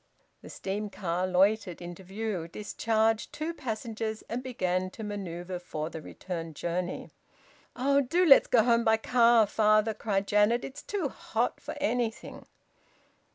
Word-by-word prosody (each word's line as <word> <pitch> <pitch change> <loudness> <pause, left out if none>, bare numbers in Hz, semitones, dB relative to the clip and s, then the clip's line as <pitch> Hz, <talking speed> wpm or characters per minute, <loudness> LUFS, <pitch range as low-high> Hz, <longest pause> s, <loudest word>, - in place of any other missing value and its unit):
The - - -11
steam 205 +2 -4
car 180 -2 -2
loitered 190 0 +2
into 175 +2 -8
view, 195 -2 -4
discharged 220 +4 0
two 315 +2 -4
passengers, 220 -4 -4
and 235 +2 -3
began 185 -8 -1
to 220 - -9
manoeuvre 185 -3 -5
for 160 -2 -5
the 160 - -7
return 165 0 -6
journey. 175 +3 -3 0.6
"Oh! 275 +2 +3
Do 335 +8 +2
let's 275 -5 +8
go 230 -3 +4
home 235 0 +3
by 220 0 +4
car, 235 -1 +5
father!" 215 +1 +3
cried 200 -2 -1
Janet. 210 +4 +3
"It's 275 +2 -8
too 395 -7 -2
hot 235 -2 -2
for - - -6
anything!" 235 0 -2
215 Hz, 145 wpm, -29 LUFS, 185-235 Hz, 0.6 s, let's